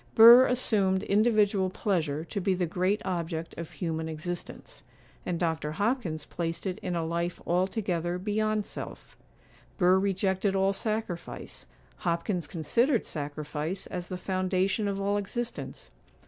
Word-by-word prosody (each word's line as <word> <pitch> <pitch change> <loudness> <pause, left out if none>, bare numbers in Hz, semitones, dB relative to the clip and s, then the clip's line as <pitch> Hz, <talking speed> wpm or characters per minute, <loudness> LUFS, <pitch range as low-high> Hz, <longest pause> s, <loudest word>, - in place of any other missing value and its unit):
Burr 235 +3 +10
assumed 200 -6 +1
individual 205 -2 +3
pleasure 165 -6 -1
to 200 +4 -4
be 190 +1 +2
the 180 -1 0
great 185 +5 0
object 170 -3 -3
of 165 -1 -6
human 160 -2 -3
existence; 170 +3 -6 0.5
and 175 -2 -1
Dr. 160 -3 -1
Hopkins 195 - -1
placed 165 +1 -4
it 185 -2 -2
in 180 -2 -3
a 165 -1 -1
life 170 +1 -2
altogether 180 -1 0
beyond 215 +2 0
self. - - -8 0.6
Burr 185 -1 +5
rejected 195 0 +1
all 195 +1 +3
sacrifice, 215 -5 -4 0.3
Hopkins 170 -1 -1
considered 230 - +1
sacrifice 150 +4 -4
as 180 -1 -5
the 185 - -4
foundation 185 +2 0
of 200 -1 -2
all 200 +1 +1
existence. 235 +4 -5
185 Hz, 135 wpm, -28 LUFS, 170-205 Hz, 0.6 s, Burr